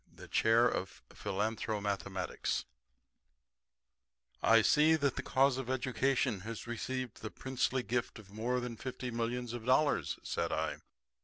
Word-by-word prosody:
THE - - -12
CHAIR 115 +2 +4
OF 95 -5 -3
PHILANTHROMATHEMATICS 100 -3 -2 1.8
"I 115 0 +6
see 155 +7 +5
that 140 -4 +1
the - - -2
cause 135 0 +3
of 130 -2 -5
Education 130 -2 +1
has 110 +4 -6
received 125 +1 -4
the 110 - -4
princely 130 0 -1
gift 120 0 -2
of 100 -3 -13
more 120 +4 0
than 120 -2 -5
fifty 125 +1 -5
millions 120 +1 -2
of 120 -2 -5
dollars," 130 - +2
said - - -1
I. - - -1
120 Hz, 135 wpm, -33 LUFS, 110-130 Hz, 1.8 s, I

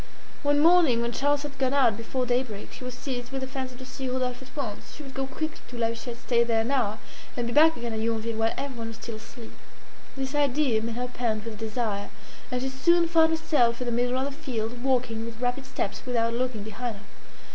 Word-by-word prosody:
One 290 0 +3
morning, 325 -8 +6
when 235 - 0
Charles 285 +3 +1
had 275 -2 -7
gone 265 0 +2
out 245 -6 +5
before 250 +3 -2
day 245 +1 +3
break, 215 -6 -8
she - - -9
was 250 0 -5
seized 250 -1 -4
with 270 0 -3
the - - -1
fancy 260 -1 -4
to 260 +1 -9
see 260 0 -4
Rodolphe 250 0 -1
at 260 - -15
once. 225 -8 -4
She 300 - -8
would 270 -2 -9
go 270 0 -2
quickly 310 +3 -4
to 245 - -8
La 230 -1 +2
Huchette, 235 +1 -5
stay 240 -1 +3
there 230 -1 +2
an 230 +4 -1
hour, 225 -6 +1 0.4
and 240 - 0
be 235 - -2
back 320 +2 +7
again 235 -1 -3
at 220 - -1
Yonville 225 0 -1
while 225 0 +2
everyone 250 -5 -3
was 225 - -6
still 230 0 -6
asleep. 230 +1 -11 0.7
This 265 +1 -2
idea 285 -5 +3
made 225 0 -3
her 245 +1 -1
pant 230 -3 -1
with 220 -2 -6
desire, 220 -2 -2 0.4
and 250 0 -1
she 265 - 0
soon 335 +6 +4
found 325 -1 +5
herself 290 -7 +2
in 250 - -2
the 240 - -1
middle 245 +2 +1
of 260 - +1
the 285 - -2
field, 240 -3 -2
walking 245 -4 +1
with 230 0 -7
rapid 250 +2 -1
steps, 210 -6 -3
without 230 -2 +1
looking 240 -3 -1
behind 220 +2 -4
her. 200 - -13
250 Hz, 235 wpm, -27 LUFS, 230-270 Hz, 0.7 s, back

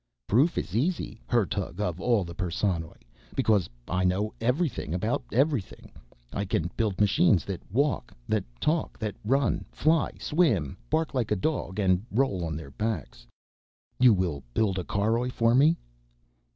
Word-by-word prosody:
"Proof 140 - +3
is 95 - -3
easy, 130 - -1
Hertug 100 -5 0
of 90 -3 -2
all 115 -2 +2
the 85 -1 -7
Perssonoj, 85 - -2 0.3
because 105 -6 +2 0.2
I 90 +1 0
know 95 +4 +1
everything 125 - 0
about 110 +6 0
everything. 135 -5 0 0.4
I 100 - -1
can 85 -3 -1
build 105 -5 -1
machines 100 -3 +4
that 95 -3 -4
walk, 140 +6 0 0.2
that 110 -3 +1 0.2
talk, 160 +1 0
that 105 -3 -3
run, 135 +6 +1
fly, 160 +1 +2
swim, 115 - +1
bark 160 0 0
like 125 -5 0
a 105 - +2
dog 100 -3 -2
and 95 -2 +2
roll 105 -6 +1
on 80 -2 -3
their 80 -4 -9
backs." 105 - -4 0.7
"You 125 -1 +7
will 90 -8 0
build 95 -4 +1
a - - -2
caroj 115 +7 0
for 115 -1 +2
me?" 150 +6 +5
105 Hz, 150 wpm, -27 LUFS, 90-125 Hz, 0.7 s, You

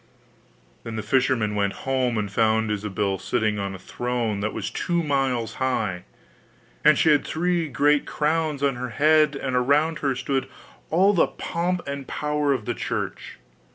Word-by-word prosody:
Then 115 -1 -6
the 110 - -3
fisherman 120 -2 +1
went 100 -1 0
home, 130 -3 +1
and 105 -2 -2
found 110 0 +2
Ilsabill 100 -2 -2
sitting 105 +2 0
on 100 -1 -3
a - - -7
throne 115 +1 -2
that 105 +1 -1
was - - -4
two 175 -1 -1
miles 135 -6 0
high. 105 -9 -1 0.8
And 150 -1 +6
she 160 - +4
had 145 - +4
three 175 0 0
great 145 +2 +2
crowns 155 -2 0
on 135 -3 +1
her 125 +1 -4
head, 155 +2 +3
and 130 -2 -3
around 145 +6 +2
her 140 -2 0
stood 135 +1 -1 0.4
all 190 +5 +4
the 175 - +4
pomp 175 +1 -2
and 140 -1 -5
power 150 -1 -1
of 125 -6 -1
the - - -1
Church. - - -4
130 Hz, 165 wpm, -24 LUFS, 110-150 Hz, 0.8 s, And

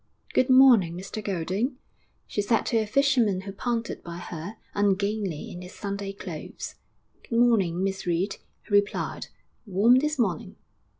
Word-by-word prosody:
'Good 255 - +3
morning, 245 -10 +6
Mr 195 +3 -6
Golding!' 200 - -1 0.5
she 205 - -2
said 225 +2 +1
to 230 - +1
a 215 - -1
fisherman 240 -6 +2
who 195 +1 -7
pounded 230 +3 -3
by 170 0 -7
her, 175 +3 -7 0.2
ungainly 200 -3 0
in 175 - -8
his 180 0 -10
Sunday 200 -1 -4
clothes. 195 - -7 0.6
'Good 230 - 0
morning, 195 -7 +3
Miss 190 -1 -2
Reed!' 175 +4 0 0.3
he 205 - -8
replied. 205 0 +1 0.4
'Warm 215 +6 +5
this 300 +2 -1
morning.' 195 - -1
205 Hz, 145 wpm, -26 LUFS, 185-230 Hz, 0.6 s, morning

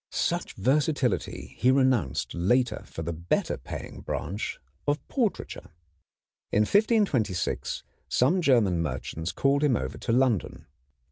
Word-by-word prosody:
Such - - -1
versatility 135 +3 0
he 125 - +4
renounced 125 - +2
later 110 +6 +1
for 80 - -6
the 85 +2 -3
better 85 +2 -1
paying - - -8
branch 100 +4 -3 0.3
of 145 0 +3
portraiture. 235 -7 -2 0.8
In 105 - +3
1526 150 - +1 0.3
some 160 +9 +3
German 110 - +3
merchants 80 +3 -3
called 140 +1 +2
him 140 -5 +4
over 65 -10 -4
to - - -2
London. 120 -5 +1
120 Hz, 120 wpm, -27 LUFS, 90-140 Hz, 0.8 s, he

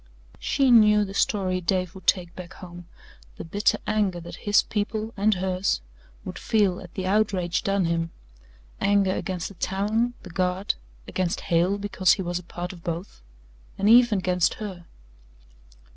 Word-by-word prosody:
She 270 -2 +2
knew 210 -2 +6
the 195 - -8
story 185 -3 0
Dave 180 0 0
would 190 -2 -13
take 175 -3 +2
back 180 -2 -9
home 175 -2 -11 0.5
the - - -6
bitter 200 +6 +1
anger 205 -4 0
that 170 0 -9
his 205 - +5
people 215 +1 -3
and 210 +1 +2
hers 185 - 0 0.5
would - - -6
feel 205 -5 +1
at 170 - -13
the 190 - -3
outrage 190 -3 +1
done 195 -2 +1
him 165 0 0 0.7
anger 200 -1 +3
against 185 -3 -3
the - - -12
town, 210 +6 -1
the 180 - -10
Guard, 185 +2 0 0.3
against 185 -2 -1
Hale 175 +4 +1
because 195 -3 +2
he 190 - -2
was 175 0 -2
a - - -12
part 175 +1 -6
of 170 -2 -14
both 170 - -5 0.6
and 200 - +1
even 235 -1 +6
against 180 -1 +1
her. 185 -5 -7
190 Hz, 160 wpm, -25 LUFS, 175-205 Hz, 0.7 s, knew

